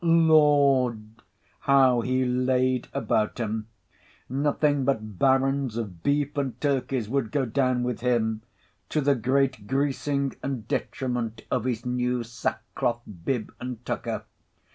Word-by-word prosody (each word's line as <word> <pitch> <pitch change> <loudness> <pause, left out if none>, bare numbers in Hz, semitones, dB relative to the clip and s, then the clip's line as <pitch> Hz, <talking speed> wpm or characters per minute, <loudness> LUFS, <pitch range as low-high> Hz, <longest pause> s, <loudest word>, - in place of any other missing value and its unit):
Lord! 145 -8 +4 0.5
how 130 -3 +4
he 130 +2 +1
laid 125 0 +1
about 110 -5 0
him! 110 -1 -2 0.6
Nothing 145 +1 +1
but 110 -7 -2
barons 135 -2 +2
of 100 -8 -5
beef 145 - 0
and 130 -4 -2
turkeys 135 -5 0
would 125 -1 -1
go 135 +1 +1
down 130 +1 +1
with 125 -2 -2
him—to 110 - -2
the 140 -1 +3
great 130 -3 0
greasing 140 +1 0
and 130 -6 -4
detriment 125 -3 -2
of 125 - 0
his 120 -2 -2
new 125 0 0
sackcloth 115 +1 -3 0.2
bib 125 -5 -2
and 125 -1 -6
tucker. - - -3
125 Hz, 120 wpm, -26 LUFS, 115-140 Hz, 0.6 s, Lord